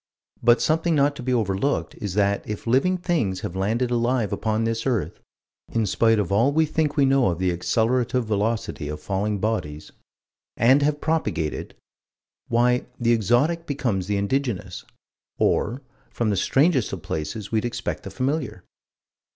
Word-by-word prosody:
But 120 +1 +4
something 165 +1 +1
not 145 0 +2
to - - -6
be 130 +1 -2
overlooked 110 +2 0
is 100 -3 -3
that 100 -1 +2
if 105 - -5
living 135 +11 +2
things 155 - -1
have 85 - -5
landed 115 +6 0
alive 120 -2 +1
upon 110 0 -1
this 115 +2 -1
earth 120 -7 -1 0.5
in 115 -2 +1
spite 115 +3 +3
of 100 -3 -1
all 115 +8 +3
we 160 +2 +3
think 155 0 -1
we 140 - +5
know 135 -2 +3
of 85 - 0
the 90 0 +1
accelerative 120 +7 +1
velocity 105 -7 -2
of 75 0 -5
falling 100 +5 -1
bodies 95 -8 -3 0.7
and 130 +5 +5
have 145 +1 0
propagated 155 - -2 0.7
why 125 +1 +2
the 120 -1 +3
exotic 135 - +1
becomes 115 -10 -1
the 100 0 0
indigenous, 120 +1 -2 0.5
or 125 +5 0 0.3
from 115 -3 -1
the - - +1
strangest 135 - +2
of - - -6
places 95 +7 -4
we'd 110 -1 +1
expect 120 0 -3
the - - -8
familiar. 130 - -2
115 Hz, 160 wpm, -24 LUFS, 100-135 Hz, 0.7 s, we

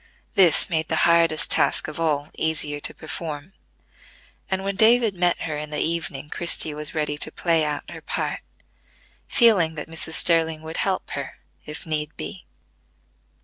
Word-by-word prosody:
This 180 -5 +6
made 160 -3 -1
the 160 - 0
hardest 170 -2 +3
task - - +3
of 155 +1 -6
all 150 -2 0
easier 150 -2 -1
to - - -1
perform; 155 +2 -6 1.0
and, 190 0 -1
when 195 0 -2
David 225 0 +4
met 175 -1 +1
her 155 -2 -3
in 150 0 -6
the 150 - -4
evening, 160 -3 -2
Christie 160 -1 0
was 150 +1 -7
ready 150 -1 -1
to 155 - +1
play 165 -2 +1
out 150 -1 -3
her - - -9
part, - - -3 0.9
feeling 195 -10 +4
that 150 - -5
Mrs. 160 0 -3
Sterling 160 -1 +2
would 160 +1 -6
help 190 -1 -1
her, 140 -2 -5 0.3
if 150 +1 -8
need 155 -1 -3
be. 190 - -8
160 Hz, 160 wpm, -23 LUFS, 150-175 Hz, 1.0 s, This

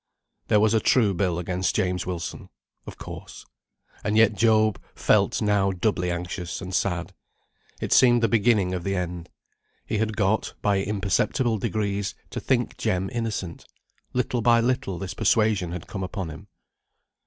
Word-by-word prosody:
There 105 - +4
was 110 +1 +3
a 110 - +4
true 110 -2 +3
bill 90 -1 0
against 90 +1 -1
James 90 -4 0
Wilson. 90 -2 -5 0.4
Of - - -8
course. - - -9 0.6
And 105 +1 0
yet 110 -1 +5
Job 110 -1 +3
felt - - +2
now 100 -2 +2
doubly 90 -1 0
anxious 85 0 -4
and 95 -1 -7
sad. 90 -2 -1 0.7
It - - 0
seemed 120 -2 +5
the - - +5
beginning 105 -4 +2
of 90 -2 -3
the 100 +1 -1
end. 90 -1 -4 0.6
He 105 - -2
had 110 -1 -1
got, 105 +1 0
by 100 -1 +3
imperceptible 105 +4 0
degrees, 100 -1 -2 0.2
to - - -3
think - - -1
Jem 95 +1 -1
innocent. 110 -7 -4 0.4
Little 125 -1 -1
by 115 +1 +5
little 115 -6 0
this 95 0 -5
persuasion 105 -6 +2
had 90 -2 -6
come 95 - -6
upon 95 -2 -4
him. 80 +6 -11
100 Hz, 155 wpm, -25 LUFS, 90-110 Hz, 0.7 s, yet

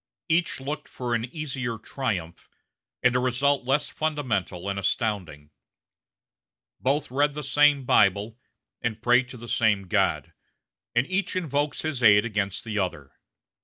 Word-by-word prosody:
Each 170 -2 +1
looked 145 +3 -5
for 125 -1 -4
an 115 0 0
easier 130 -4 -4
triumph, 100 -8 -4 0.5
and 125 0 +4
a - - +4
result 130 +2 +1
less 135 +3 +1
fundamental 115 - -2
and 100 0 -2
astounding. 90 -8 -2 1.3
Both 140 +1 0
read 145 +2 +1
the 150 - -4
same 145 -1 +4
Bible, 105 +2 +3 0.4
and 115 -2 -2
pray 120 +2 +4
to 125 0 -11
the 120 0 -10
same 110 -3 +2
God; - - 0 0.6
and 120 +2 +3
each 185 +3 -1
invokes 145 -4 -1
his 155 -5 -2
aid 105 -2 +6
against 105 -4 -2
the 110 -2 -3
other. 75 -8 -3
125 Hz, 140 wpm, -26 LUFS, 105-145 Hz, 1.3 s, aid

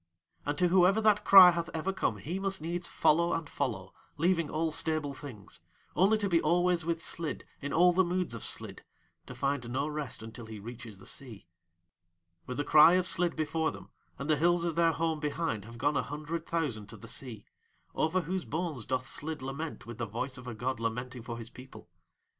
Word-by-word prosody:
And 145 - -1
to 180 -1 +3
whoever 185 +3 +5
that 210 -1 +3
cry 190 -2 +10
hath 170 0 -3
ever 180 +5 -1
come 110 - -1
he 165 - -4
must 195 0 -2
needs 170 +2 -3
follow 170 +3 +2
and 165 -2 -2
follow, 110 -11 -3 0.2
leaving 170 -1 +2
all 160 +1 -1
stable 155 -2 -1
things; 130 -8 -10 0.3
only 200 +4 +4
to 205 -2 -1
be 170 -3 +3
always 175 +1 +2
with 165 0 -2
Slid 165 -2 -3 0.2
in 140 - -4
all 175 +2 +5
the 190 +2 +4
moods 180 -5 -1
of 115 - -6
Slid, - - -4 0.4
to 125 - -8
find 135 -1 -1
no 135 +4 -1
rest 150 -7 -5
until 115 +1 -9
he 110 -1 -8
reaches 115 0 -9
the 95 - -15
sea. 120 -9 -7 1.0
With 125 - -5
the 145 - 0
cry 155 +3 +7
of 185 0 +3
Slid 175 -1 +2
before 160 0 0
them - - -10 0.3
and 140 - -5
the 155 -1 +3
hills 175 +2 +3
of 170 -2 -1
their 165 -1 +3
home 160 -1 -1
behind 150 -8 -2
have 115 +1 -11
gone 145 +5 +1
a 140 - +2
hundred 155 +5 -5
thousand 135 -11 -2
to 110 +1 -11
the 115 - -12
sea, 115 -4 -6 0.5
over 170 +4 +1
whose 180 +2 -3
bones 155 -7 -3
doth 130 0 -1
Slid 150 +1 -4
lament 140 +4 -5
with 120 0 -9
the 120 - -2
voice 125 +5 -4
of 125 - -11
a 120 - -5
god 125 +2 -2
lamenting 120 +2 -3
for 115 0 -6
his 115 0 -8
people. 125 -7 -13
150 Hz, 205 wpm, -30 LUFS, 125-170 Hz, 1.0 s, cry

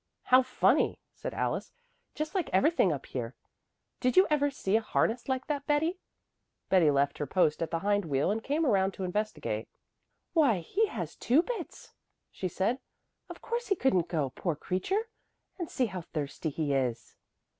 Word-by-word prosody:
"How 255 +1 +6
funny," 255 0 +2 0.2
said - - -6
Alice, - - -2 0.4
"just 305 +1 -3
like 375 -4 -1
everything 195 - +4
up 140 -3 -4
here. 120 -1 -5 0.6
Did 255 +3 +1
you 375 - +8
ever 290 -1 +3
see 215 -7 -1
a 225 - +4
harness 230 +3 0
like 260 0 -1
that, 290 -2 -3
Betty?" 320 +5 +1 0.7
Betty 180 -5 +5
left 140 0 +1
her 145 - -2
post 155 0 +2
at 165 - -1
the 165 - -1
hind 205 -1 +2
wheel 140 +3 +1
and 220 +2 -2
came 305 +4 0
around 195 -6 +2
to 190 - -5
investigate. 180 - -2 0.7
"Why 285 - +4
he 430 - +1
has - - -5
two 275 +8 +3
bits," 445 -8 -6 0.4
she 185 - -3
said. 200 +8 0 0.5
"Of - - -10
course 475 +1 -2
he 395 - +2
couldn't 185 - +2
go, 150 -6 -1
poor 170 +2 -2
creature. 365 - -1 0.5
And 345 - -3
see 255 - +1
how 185 -5 -5
thirsty 155 0 -4
he 150 -1 -1
is!" 125 -4 -1
205 Hz, 175 wpm, -30 LUFS, -, 0.7 s, you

